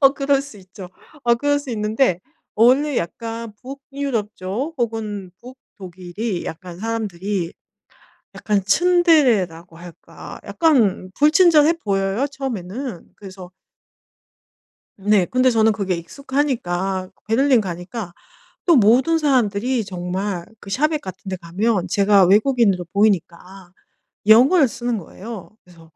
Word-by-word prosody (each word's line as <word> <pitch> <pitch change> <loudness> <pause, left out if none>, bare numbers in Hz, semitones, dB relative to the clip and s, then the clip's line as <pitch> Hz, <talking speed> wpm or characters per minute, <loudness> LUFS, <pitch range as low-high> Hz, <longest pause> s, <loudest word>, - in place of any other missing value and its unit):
어 275 -1 +7
그럴 275 -1 +1
수 275 -8 -12
있죠. 185 0 -12 0.4
어 235 0 +4
그럴 285 +4 0
수 285 -3 -8
있는데 215 -3 0 0.3
원래 260 +5 +3
약간 230 +5 -5
북유럽 275 -5 -5
쪽 230 - -4
혹은 215 -6 -3
북독일이 195 -5 -7
약간 175 +1 -8
사람들이 200 -5 -3 0.8
약간 205 -2 -1
츤데레라고 235 - +2
할까. 175 0 -12
약간 230 - +1
불친절해 310 +1 +5
보여요, 195 +5 0
처음에는. 255 -5 -6
그래서 190 -2 -11 1.5
네. 200 -1 +2
근데 255 +4 +2
저는 225 -2 +3
그게 195 -4 -2
익숙하니까 195 - -3 0.2
베를린 250 +2 +3
가니까 180 +1 -6 0.5
또 345 -3 +5
모든 255 +8 +4
사람들이 250 -4 +1
정말 180 0 -4
그 200 - -12
shop에 305 +5 +1
같은 185 +1 -9
데 185 - -2
가면 185 +3 -1
제가 200 +1 +4
외국인으로 205 -2 +3
보이니까 190 -2 -1 0.5
영어를 260 +8 +6
쓰는 240 -1 -3
거예요. 200 +3 -9
그래서 165 -3 -19
215 Hz, 275 characters per minute, -20 LUFS, 185-260 Hz, 1.5 s, 어